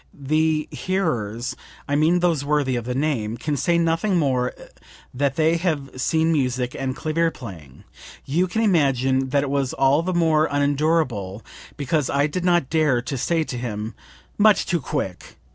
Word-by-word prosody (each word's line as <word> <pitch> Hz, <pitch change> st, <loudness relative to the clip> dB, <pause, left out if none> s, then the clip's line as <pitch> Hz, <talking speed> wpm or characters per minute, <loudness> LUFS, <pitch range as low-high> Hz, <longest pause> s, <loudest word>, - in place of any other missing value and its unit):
The 155 Hz, +2 st, 0 dB
hearers 125 Hz, -, -2 dB, 0.3 s
(I 145 Hz, -, 0 dB
mean 165 Hz, +4 st, +3 dB
those 165 Hz, -5 st, +1 dB
worthy 145 Hz, -3 st, +1 dB
of 120 Hz, -2 st, -3 dB
the 125 Hz, 0 st, -3 dB
name) 125 Hz, -6 st, -1 dB
can 150 Hz, +2 st, -2 dB
say 170 Hz, +5 st, +1 dB
nothing 170 Hz, +4 st, +1 dB
more 130 Hz, -5 st, +1 dB, 0.6 s
than 140 Hz, +2 st, +1 dB
they 160 Hz, +2 st, +3 dB
have 155 Hz, -6 st, -2 dB
seen 160 Hz, +4 st, +2 dB
music 125 Hz, -4 st, 0 dB
and 130 Hz, -1 st, -2 dB
clavier 165 Hz, +3 st, 0 dB
playing. 90 Hz, -, -11 dB, 0.4 s
You 170 Hz, +7 st, +1 dB
can 220 Hz, +6 st, -1 dB
imagine 135 Hz, -, +2 dB
that 140 Hz, +2 st, +2 dB
it 140 Hz, -, -3 dB
was 140 Hz, -2 st, 0 dB
all 135 Hz, +3 st, +3 dB
the 180 Hz, +1 st, -2 dB
more 160 Hz, -2 st, +3 dB
unendurable 140 Hz, -, 0 dB, 0.3 s
because 145 Hz, 0 st, 0 dB
I 140 Hz, +1 st, +2 dB
did 160 Hz, +4 st, -3 dB
not 175 Hz, -6 st, +2 dB
dare 155 Hz, -6 st, +3 dB
to 135 Hz, -, -4 dB
say 165 Hz, +6 st, 0 dB
to 125 Hz, -, -5 dB
him: 110 Hz, -2 st, -4 dB, 0.5 s
'Much 210 Hz, 0 st, +5 dB
too 175 Hz, -, 0 dB
quick!' 130 Hz, -11 st, -5 dB
145 Hz, 165 wpm, -23 LUFS, 130-165 Hz, 0.6 s, Much